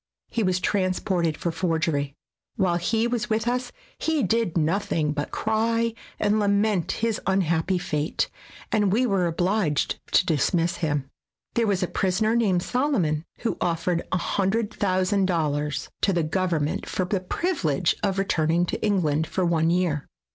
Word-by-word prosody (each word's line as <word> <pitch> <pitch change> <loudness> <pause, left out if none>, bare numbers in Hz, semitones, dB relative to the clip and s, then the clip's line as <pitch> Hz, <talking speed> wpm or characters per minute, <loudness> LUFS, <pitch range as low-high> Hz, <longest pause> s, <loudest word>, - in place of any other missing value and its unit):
He 230 - 0
was 185 -3 +1
transported 185 -4 0
for 170 - -2
forgery. 160 -4 -1 0.4
While 180 -3 +2
he 220 +6 +1
was 240 -2 -1
with 220 +1 0
us 250 +1 -1 0.3
he 315 -4 +1
did 220 -3 +1
nothing 160 -2 +1
but 145 -1 -3
cry 230 +1 0 0.3
and 210 +1 +2
lament 200 -2 +2
his 225 -1 -1
unhappy 185 -1 +1
fate, 150 -3 -1 0.4
and 205 -3 +2
we 240 +6 +3
were 195 -6 +2
obliged 175 -2 0
to - - +5
dismiss 170 +2 +1
him. 145 -5 -1 0.5
There 230 -1 +2
was 195 -3 +1
a - - 0
prisoner 210 +6 +1
named 195 -7 +2
Solomon 190 - 0 0.2
who 235 - -1
offered 170 0 0
a 185 - +2
hundred 205 +5 0
thousand 190 0 +1
dollars 150 -4 -1
to 195 - +3
the 170 -2 +1
government 160 -2 -1
for 185 - -1
the 195 +1 0
privilege 185 - 0
of 195 -2 0
return 165 -5 +1
ing 170 +2 +3
to - - -4
England 160 -7 +1
for 185 - -1
one 165 -1 +2
year. 170 -4 0
185 Hz, 155 wpm, -25 LUFS, 165-210 Hz, 0.5 s, to